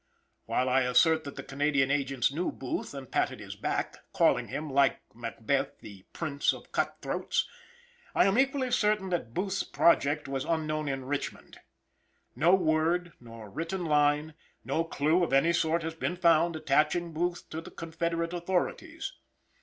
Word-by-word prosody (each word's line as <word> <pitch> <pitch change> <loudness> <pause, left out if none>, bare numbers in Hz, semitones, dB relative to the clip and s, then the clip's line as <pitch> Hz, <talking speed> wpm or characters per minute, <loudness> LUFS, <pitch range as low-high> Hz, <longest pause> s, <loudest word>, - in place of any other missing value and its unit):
While 130 - 0
I 130 +1 +3
assert 160 +6 +3
that 140 - -7
the - - -6
Canadian 140 -1 +1
agents 135 -3 +1
knew 170 +5 -1
Booth 135 +2 -5
and 135 -2 -8
patted - - 0
his - - -8
back, - - -2 0.2
calling - - +3
him, 155 +2 -4
like 140 -1 +3
Macbeth, 120 +3 -2
the 100 -3 -12
"prince 145 -4 0
of - - -12
cut - - -1
throats," - - -1 0.7
I - - +5
am 195 +5 +3
equally 270 -1 +1
certain 210 -4 +2
that 165 -10 -3
Booth's 190 0 -1
project 150 -3 +2
was 135 -1 -2
unknown 155 -2 -1
in 135 -2 -3
Richmond. 145 +1 -5 0.8
No 165 +9 +5
word, 170 0 +1
nor 115 -3 -11
written 170 - -3
line, 150 0 +2 0.3
no 165 - 0
clue 165 +2 +1
of 165 - -1
any 160 +5 +4
sort 165 0 +1
has 165 0 -3
been 165 +2 -2
found 170 -1 +3
attaching 155 +3 +1
Booth 175 +2 -2
to 160 - -4
the - - -10
confederate 165 +1 -3
authorities. 190 - -2
155 Hz, 160 wpm, -29 LUFS, 140-175 Hz, 0.8 s, I